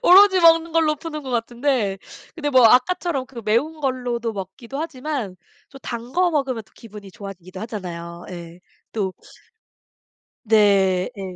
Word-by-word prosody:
오로지 380 Hz, -1 st, +7 dB
먹는 330 Hz, -1 st, +5 dB
걸로 315 Hz, -2 st, +3 dB
푸는 305 Hz, -1 st, -6 dB
것 265 Hz, -, -7 dB
같은데 235 Hz, -3 st, 0 dB, 0.4 s
근데 295 Hz, -4 st, -2 dB
뭐 255 Hz, -3 st, +6 dB
아까처럼 270 Hz, +2 st, +2 dB
그 235 Hz, -4 st, -9 dB
매운 290 Hz, +9 st, 0 dB
걸로도 245 Hz, -4 st, -2 dB
먹기도 205 Hz, +7 st, -7 dB
하지만 270 Hz, -, -4 dB, 0.3 s
또 275 Hz, -, -12 dB
단 235 Hz, +1 st, -6 dB
거 360 Hz, -1 st, +3 dB
먹으면 270 Hz, -7 st, -1 dB
또 190 Hz, -, -29 dB
기분이 210 Hz, -3 st, -12 dB
좋아지기도 190 Hz, -3 st, -10 dB
하잖아요. 175 Hz, -6 st, -7 dB
예. 170 Hz, -1 st, -9 dB, 0.3 s
또 195 Hz, -4 st, -1 dB, 1.4 s
네. 195 Hz, -3 st, +4 dB
예 195 Hz, -, -6 dB
240 Hz, 290 characters per minute, -22 LUFS, 195-295 Hz, 1.4 s, 오로지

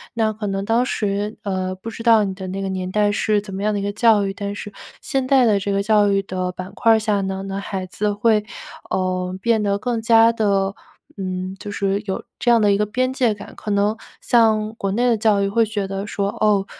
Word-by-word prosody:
那 220 Hz, -1 st, +1 dB
可 210 Hz, 0 st, -5 dB
能 195 Hz, 0 st, -2 dB
当 230 Hz, +3 st, +2 dB
时， 205 Hz, -2 st, -2 dB
呃， 185 Hz, -2 st, -2 dB
不 190 Hz, +5 st, -8 dB
知 230 Hz, -, -8 dB
道 225 Hz, -3 st, +5 dB
你 190 Hz, -1 st, -2 dB
的 190 Hz, -1 st, -7 dB
那 195 Hz, +1 st, -4 dB
个 195 Hz, -, -3 dB
年 185 Hz, -1 st, -3 dB
代 205 Hz, 0 st, +2 dB
是 210 Hz, 0 st, +1 dB
怎 200 Hz, -2 st, -10 dB
么 195 Hz, -, -4 dB
样 215 Hz, 0 st, +1 dB
的 205 Hz, -, -1 dB
一 200 Hz, -, -4 dB
个 205 Hz, -, -1 dB
教 220 Hz, -2 st, +4 dB
育， 195 Hz, -, -3 dB
但 200 Hz, 0 st, -4 dB
是 210 Hz, 0 st, -7 dB, 0.3 s
现 265 Hz, -1 st, -1 dB
在 265 Hz, -3 st, +5 dB
的 205 Hz, -3 st, +3 dB
这 200 Hz, +1 st, -2 dB
个 200 Hz, -, +1 dB
教 210 Hz, -1 st, +4 dB
育 195 Hz, 0 st, +2 dB
的 185 Hz, -1 st, -3 dB
板 185 Hz, +2 st, -8 dB
块 225 Hz, +1 st, +4 dB
儿 -, -, +2 dB
下 210 Hz, -2 st, 0 dB
呢， 190 Hz, 0 st, -3 dB
那 195 Hz, 0 st, -4 dB
孩 190 Hz, -1 st, -4 dB
子 205 Hz, +3 st, -2 dB
会， 210 Hz, 0 st, +2 dB, 0.4 s
呃， 185 Hz, -1 st, -1 dB
变 230 Hz, -1 st, +2 dB
得 200 Hz, -1 st, +1 dB
更 235 Hz, 0 st, -2 dB
加 225 Hz, 0 st, +5 dB
的， 200 Hz, -3 st, 0 dB, 0.4 s
嗯， 185 Hz, 0 st, -4 dB
就 205 Hz, -, -7 dB
是 200 Hz, 0 st, -1 dB
有 190 Hz, -, -3 dB, 0.2 s
这 240 Hz, -, +2 dB
样 230 Hz, -2 st, +5 dB
的 205 Hz, -1 st, +4 dB
一 -, -, +2 dB
个 210 Hz, -, +1 dB
边 255 Hz, +5 st, -1 dB
界 245 Hz, -5 st, +2 dB
感。 200 Hz, -, -11 dB
可 210 Hz, -, -5 dB
能 205 Hz, +2 st, +1 dB, 0.2 s
像 220 Hz, -2 st, +2 dB
国 195 Hz, -3 st, -2 dB
内 240 Hz, +5 st, +1 dB
的 230 Hz, -, +2 dB
教 210 Hz, -2 st, +2 dB
育 200 Hz, -, +1 dB
会 230 Hz, +2 st, +2 dB
觉 205 Hz, -2 st, -3 dB
得 195 Hz, +1 st, -4 dB
说 200 Hz, -1 st, -1 dB
哦， 205 Hz, -1 st, +1 dB
205 Hz, 265 characters per minute, -21 LUFS, 195-220 Hz, 0.4 s, 道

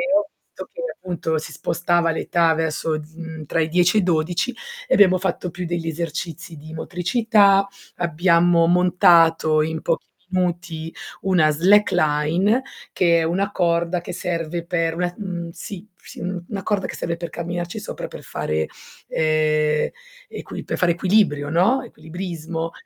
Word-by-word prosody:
ho 305 Hz, 0 st, +2 dB, 0.2 s
visto -, -, -9 dB
che -, -, -7 dB
appunto 170 Hz, -3 st, -2 dB
si 155 Hz, -, -6 dB
spostava 170 Hz, 0 st, 0 dB
l'età 165 Hz, 0 st, +2 dB
verso, 160 Hz, 0 st, -1 dB
uhm, 160 Hz, 0 st, -6 dB
tra 165 Hz, -, -1 dB
i 160 Hz, -, 0 dB
10 180 Hz, +4 st, +3 dB
e -, -, +6 dB
i -, -, -2 dB
12 175 Hz, +7 st, 0 dB, 0.3 s
e -, -, +2 dB
abbiamo 185 Hz, -2 st, +6 dB
fatto 180 Hz, -1 st, -2 dB
più 175 Hz, +2 st, -6 dB
degli 170 Hz, -1 st, -3 dB
esercizi 165 Hz, +1 st, -5 dB
di 155 Hz, +2 st, -11 dB
motricità, 195 Hz, +4 st, +3 dB, 0.3 s
abbiamo 170 Hz, 0 st, +3 dB
montato 170 Hz, -3 st, +4 dB
in 160 Hz, +1 st, -2 dB
pochi 165 Hz, -, -1 dB, 0.3 s
minuti 175 Hz, -3 st, -2 dB, 0.3 s
una 180 Hz, -5 st, +3 dB
slackline, 175 Hz, -, +3 dB, 0.3 s
che 170 Hz, -2 st, +3 dB
è -, -, +1 dB
una 190 Hz, +5 st, 0 dB
corda 170 Hz, -1 st, +1 dB
che 175 Hz, -, -7 dB
serve 170 Hz, -1 st, -3 dB
per 165 Hz, -2 st, 0 dB
una 175 Hz, 0 st, -1 dB
mhmm, 175 Hz, -5 st, -5 dB
sì, 180 Hz, +4 st, -8 dB
sì -, -, -13 dB
una 185 Hz, +2 st, -5 dB
corda 205 Hz, -3 st, 0 dB
che -, -, -7 dB
serve 170 Hz, 0 st, -3 dB
per 170 Hz, 0 st, -5 dB
camminarci 175 Hz, +2 st, -4 dB
sopra -, -, -6 dB
per -, -, -10 dB
fare, 80 Hz, 0 st, -2 dB, 0.4 s
ehm, 155 Hz, -1 st, +1 dB, 0.4 s
equi -, -, -7 dB
per -, -, -3 dB
fare 175 Hz, -2 st, +3 dB
equilibrio, 175 Hz, -5 st, +2 dB
no? 190 Hz, -, +3 dB
Equilibrismo. 165 Hz, -3 st, -5 dB
170 Hz, 150 wpm, -22 LUFS, 160-180 Hz, 0.4 s, e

